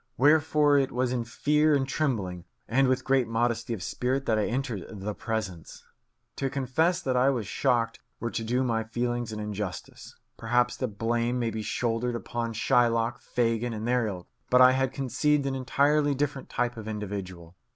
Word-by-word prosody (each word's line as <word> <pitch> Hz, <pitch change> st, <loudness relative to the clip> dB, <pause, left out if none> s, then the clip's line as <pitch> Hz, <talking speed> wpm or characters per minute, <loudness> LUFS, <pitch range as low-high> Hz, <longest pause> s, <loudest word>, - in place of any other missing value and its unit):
Wherefore 150 Hz, 0 st, +4 dB
it 135 Hz, -1 st, 0 dB
was 125 Hz, 0 st, 0 dB
in 120 Hz, -2 st, -1 dB
fear 150 Hz, +5 st, +2 dB
and 135 Hz, -1 st, 0 dB
trembling, 100 Hz, -, -2 dB, 0.2 s
and 135 Hz, +3 st, +3 dB
with 130 Hz, 0 st, +1 dB
great 130 Hz, -3 st, +2 dB
modesty 115 Hz, +1 st, -1 dB
of 95 Hz, -, -8 dB
spirit, 130 Hz, +5 st, -1 dB
that 110 Hz, -1 st, +2 dB
I 105 Hz, -, +1 dB
entered 120 Hz, -6 st, -2 dB
the 105 Hz, 0 st, -5 dB
Presence. 105 Hz, -8 st, -5 dB, 0.5 s
To 135 Hz, -, -1 dB
confess 140 Hz, +7 st, +1 dB
that 130 Hz, -1 st, 0 dB
I 125 Hz, +2 st, +4 dB
was 120 Hz, -6 st, -1 dB
shocked 115 Hz, +1 st, 0 dB, 0.2 s
were 120 Hz, -, -3 dB
to 115 Hz, -, -3 dB
do 125 Hz, +3 st, 0 dB
my 115 Hz, -3 st, 0 dB
feelings 120 Hz, +1 st, -2 dB
an 105 Hz, -, -5 dB
injustice. 105 Hz, -2 st, -6 dB, 0.2 s
Perhaps 120 Hz, +2 st, +1 dB
the 130 Hz, -, -1 dB
blame 115 Hz, +3 st, -1 dB
may 115 Hz, -2 st, -1 dB
be 110 Hz, 0 st, -4 dB
shouldered 120 Hz, +2 st, -1 dB
upon 115 Hz, +1 st, -3 dB
Shylock, 120 Hz, +1 st, +2 dB
Fagin, 115 Hz, -1 st, 0 dB
and 110 Hz, +1 st, -4 dB
their 125 Hz, -2 st, +2 dB
ilk; 90 Hz, -4 st, -6 dB, 0.2 s
but 125 Hz, -, +5 dB
I 130 Hz, 0 st, +8 dB
had 130 Hz, 0 st, +1 dB
conceived 140 Hz, +2 st, +1 dB
an 135 Hz, -, -1 dB
entirely 140 Hz, +3 st, +2 dB
different 140 Hz, -1 st, -2 dB
type 120 Hz, -1 st, -1 dB
of 110 Hz, -1 st, -7 dB
individual. 95 Hz, -5 st, -6 dB
120 Hz, 180 wpm, -27 LUFS, 110-135 Hz, 0.5 s, I